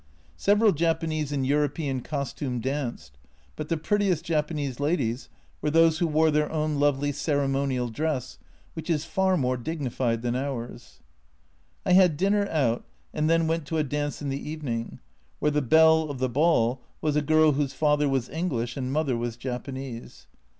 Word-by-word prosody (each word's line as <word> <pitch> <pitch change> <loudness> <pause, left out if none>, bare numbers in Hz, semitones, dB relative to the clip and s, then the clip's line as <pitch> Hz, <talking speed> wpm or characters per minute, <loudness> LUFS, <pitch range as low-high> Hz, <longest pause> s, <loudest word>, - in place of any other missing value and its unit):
Several 205 - +4
Japanese 160 -2 -1
in 140 -2 -1
European 145 -1 0
costume 140 -2 -3
danced, 120 - -4 0.4
but 155 -1 -6
the 165 - +1
prettiest 190 -1 0
Japanese 150 -5 -1
ladies 145 -5 -1 0.3
were 150 - 0
those 165 +1 +4
who 170 - +2
wore 155 0 +3
their 150 0 +1
own 155 -2 -1
lovely 145 0 +2
cere 145 0 0
monial 135 -3 -1
dress, 150 -2 -2 0.3
which 160 - -7
is 155 -2 0
far 190 +3 +1
more 130 -3 0
dignified 125 -4 -2
than 120 0 -1
ours. 130 -3 -5 0.8
I 180 - +3
had 180 -5 +5
dinner 200 +3 +2
out, 125 -7 +1 0.3
and 155 +1 0
then 165 0 +3
went 160 -2 -1
to 160 - -2
a 155 - +2
dance 145 +1 -3
in 140 - -2
the 135 +1 -3
evening, 125 -7 -4 0.4
where 150 - +1
the 150 0 +1
belle 160 +3 +5
of 140 - -4
the 130 +1 0
ball 130 -3 +2 0.2
was 150 -1 0
a 150 - +3
girl 155 +1 +4
whose 140 -1 -1
father 150 0 +2
was 135 -3 0
English 130 -8 -2
and 130 -1 -3
mother 145 -3 0
was 120 0 -3
Japanese. 130 0 -6
145 Hz, 170 wpm, -26 LUFS, 130-160 Hz, 0.8 s, had